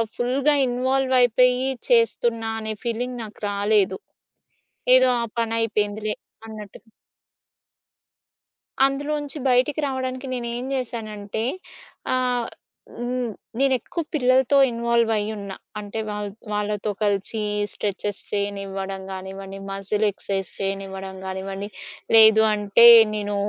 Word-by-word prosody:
ఫుల్‌గా 265 +4 +2
ఇన్వాల్వ్ 260 +1 +1
అయిపోయి 250 +2 +3 0.2
చేస్తున్నా 240 - +2
అనే 220 0 -4
ఫీలింగ్ 245 +1 -3
నాకు 215 -1 -11
రాలేదు. 205 - +1 1.0
ఏదో 255 0 +6
ఆ - - 0 0.2
పనయిపోయిందిలే 215 -2 -1 0.3
అన్నట్టు. 215 -2 -10 2.0
అందులోంచి 290 +1 -2
బయటికి 255 +4 +2
రావడానికి 260 0 -4
నేనుం 240 0 -4
జేశానంటే 220 -4 -4 0.7
ఆహ్, 250 -2 0 0.5
హ్మ్. 245 -1 -2 0.3
నేను 275 -1 +3
ఎక్కువ 335 - -4
పిల్లలతో 260 -1 +3
ఇన్వాల్వ్ 235 -1 +1
అయ్యున్నా. 205 -2 -4 0.2
అంటే 205 +1 -6
వాళ్ 210 0 -4 0.2
వాళ్ళతో 210 0 -2
కలిసి 205 +2 -1 0.3
స్ట్రెచెస్ 205 0 -3
చేయనివ్వడం 195 -1 -3
కానివ్వండి, 190 +1 -7
మసిల్ 195 +2 -1
ఎక్సర్సైజ్ 195 -1 -4
చేయనివ్వడం 195 -1 -4
గానివ్వండి. 195 +1 -5 0.5
లేదు 220 0 +8
అంటే 205 +2 +4 0.3
నేను 205 -1 -3
220 Hz, 95 wpm, -23 LUFS, 205-250 Hz, 2.0 s, లేదు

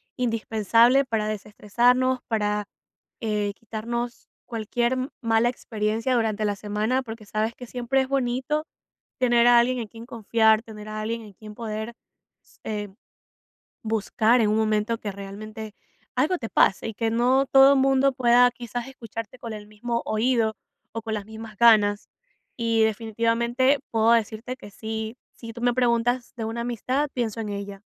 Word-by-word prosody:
indispensable 230 +2 +3
para 220 -4 -1
desestresarnos, 240 +5 +1
para, 210 -2 0 0.6
eh, 210 -2 -1
quitarnos 235 +2 -5 0.2
cualquier 235 +2 -1 0.2
mala 230 +1 +3
experiencia 225 +1 -1
durante 220 -2 0
la 205 -1 0
semana, 215 +6 -1
porque 225 -2 -9
sabes 215 +2 -1
que 245 - -9
siempre 250 +2 0
es 260 - -2
bonito 270 +3 -1 0.5
tener 240 -1 +4
a 240 -1 +7
alguien 250 +1 +1
en 225 - -4
quien 230 +2 -11
confiar, 220 -1 +2
tener 215 -2 -10
a 215 0 -4
alguien 230 +1 -3
en 205 -2 -13
quien 210 +1 -12
poder 220 0 -5 0.5
s - - -26
eh, 210 -1 -4 0.9
buscar 220 +2 +2
en 210 - +3
un 215 - +2
momento 215 +1 +1
que 205 - -4
realmente 210 +2 -8 0.4
algo 305 +8 +2
te 225 - -5
pase 195 - +3
y 225 - -6
que 225 +1 0
no 255 +4 +3
todo 270 +1 +7
mundo 270 0 +3
pueda 245 -1 +5
quizás 240 +1 -6
escucharte 230 -2 -8
con 230 -2 -7
el 210 -1 -9
mismo 235 +3 -3
oído 220 0 +1 0.4
o 225 - -4
con 220 -1 -4
las 205 -1 -5
mismas 220 -1 -10
ganas. 210 -3 +5 0.5
Y, 230 -1 +2
definitivamente, 230 +4 +1
puedo 225 0 +3
decirte 230 +2 -1
que 205 - -11
sí 220 +2 -5
si 230 -1 -10
tú 235 - -9
me 245 -1 +2
preguntas 245 0 +1
de 225 - -3
una 230 +1 -3
amistad, 255 +5 -1
pienso 230 -3 -2
en 210 - -4
ella. 200 -1 -6
230 Hz, 160 wpm, -25 LUFS, 215-245 Hz, 0.9 s, a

